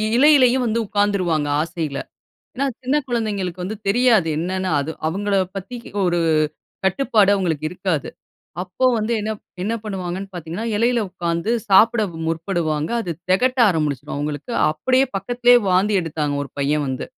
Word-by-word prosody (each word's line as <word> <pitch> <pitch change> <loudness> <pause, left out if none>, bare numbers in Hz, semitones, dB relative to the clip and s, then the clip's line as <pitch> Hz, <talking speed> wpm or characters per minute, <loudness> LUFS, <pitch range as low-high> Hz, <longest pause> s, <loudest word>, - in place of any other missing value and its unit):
இலையிலயும் 260 -2 +5
வந்து 230 0 0
உட்காந்துருவாங்க 190 -7 +1
ஆசையில. 160 -3 -3 0.6
ஏன்னா 275 +2 0 0.2
சின்ன 260 +3 0
கொழந்தைங்களுக்கு 200 -7 -2
வந்து 210 +4 -4
தெரியாது. 225 -4 +4
என்னென்னா 185 +2 -2
அது 140 +3 -3 0.2
அவங்கள 200 +5 -1 0.2
பத்தி 195 +6 -6 0.3
ஒரு 175 -1 +1 0.7
கட்டுப்பாடு 205 0 +3
அவங்களுக்கு 165 -6 -1
இருக்காது. 180 -4 -2 0.5
அப்போ 190 +8 -2
வந்து 215 +1 -1
என்ன 215 +1 -2 0.3
என்ன 215 +4 -1
பண்ணுவாங்கன்னு 190 -2 -4
பார்த்தீங்கன்னா, 175 +5 -5
எலையில 235 +1 +2
உட்காந்து 170 +2 -2 0.2
சாப்பிட 225 +4 +5 0.3
முற்படுவாங்க. 165 -2 -1
அது 180 - -4 0.2
தெகட்ட 255 +7 +2
ஆரம்பிச்சுரும் 150 -7 -2
அவங்களுக்கு. 145 - -4 0.2
அப்படியே 255 - +2
பக்கத்துலயே 245 +5 +4
வாந்தி 195 +3 +3
எடுத்தாங்க 150 -3 -2
ஒரு 140 - -11
பையன் 145 +1 +1
வந்து. 130 -1 -3
190 Hz, 135 wpm, -21 LUFS, 165-225 Hz, 0.7 s, இலையிலயும்